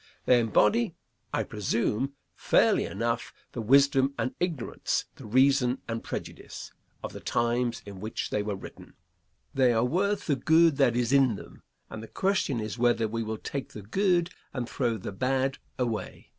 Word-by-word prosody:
They 125 - +5
embody, 185 - +2 0.4
I - - 0
presume, 115 +5 -1 0.2
fairly - - +3
enough, - - -2 0.2
the 120 - -4
wisdom 135 +3 +4
and 130 - -1
ignorance, 170 -9 -1
the 125 - -11
reason 130 +2 +3
and 115 0 -3
prejudice, - - -7 0.3
of - - -5
the - - -7
times 120 0 0
in 100 -2 -9
which 110 +3 -4
they 105 - +1
were 105 -1 -3
written. - - -11 0.6
They 130 -2 +4
are 115 +1 +2
worth 195 +9 0
the 145 - +2
good 160 +3 +4
that 130 -5 +3
is 120 +1 +1
in 135 -5 +4
them, - - -12 0.3
and 110 - -8
the 110 - -9
question 190 - 0
is 110 +2 -5
whether 120 -2 +3
we 115 +2 -3
will 110 0 -3
take 140 +4 -5
the 105 - -8
good 175 - +1 0.2
and 125 -3 -2
throw 120 -4 -1
the 100 - -6
bad 130 +5 0 0.2
away. 115 -4 -3
125 Hz, 170 wpm, -28 LUFS, 115-140 Hz, 0.6 s, They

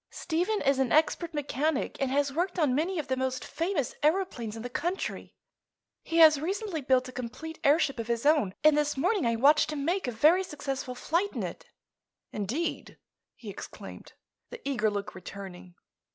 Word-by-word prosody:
"Stephen 355 +6 -1
is 275 0 +2
an 265 -3 +1
expert 320 +2 +2
mechanic 295 -1 -2
and 270 - +1
has 280 +1 +1
worked 355 +4 -1
on 300 -7 +2
many 335 +7 0
of 305 - -3
the 260 - 0
most 260 0 -2
famous 325 -4 -2
aëroplanes 300 - 0
in 225 - -7
the - - -3
country. 350 +9 -4 0.7
He 330 - -3
has 310 -3 +7
recently 385 -1 -2
built 255 -1 +2
a - - -8
complete 255 +7 -7
airship 280 -2 +3
of 230 - -4
his 235 +2 -1
own, 290 -11 +3
and 305 -1 +6
this 295 -1 0
morning 365 - +1
I 230 - +1
watched 290 +7 +4
him 285 -2 -3
make 355 -2 0
a - - -1
very 310 +11 +4
successful 275 -6 -5
flight 345 +10 -1
in - - -3
it." - - -7 0.6
"Indeed?" 235 - -3 0.4
he - - -8
exclaimed, - - -10 0.4
the 485 -10 -9
eager 220 -6 +1
look 205 0 -4
returning. 185 -1 -10
290 Hz, 180 wpm, -28 LUFS, 250-330 Hz, 0.7 s, has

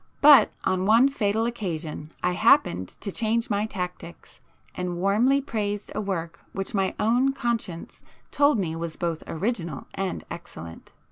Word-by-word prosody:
But 290 -1 +8
on 185 0 0
one 230 +5 +6
fatal 220 -4 0
occasion 170 -9 -4
I 180 - +2
happened 200 - +3
to 200 - -3
change 230 +2 0
my 205 +1 +1
tactics 180 -4 -7 0.3
and 180 -1 -3
warmly 220 +9 +3
praised 210 -6 -3
a - - -2
work 170 -4 -4
which 195 0 -4
my 195 -2 0
own 245 +5 +3
conscience 230 -10 -3 0.3
told 285 -2 +4
me 170 -5 -2
was 165 -1 -5
both 170 -2 -2
original 170 - -3
and 195 -1 -3
excellent. 85 - -9
195 Hz, 145 wpm, -25 LUFS, 170-230 Hz, 0.3 s, But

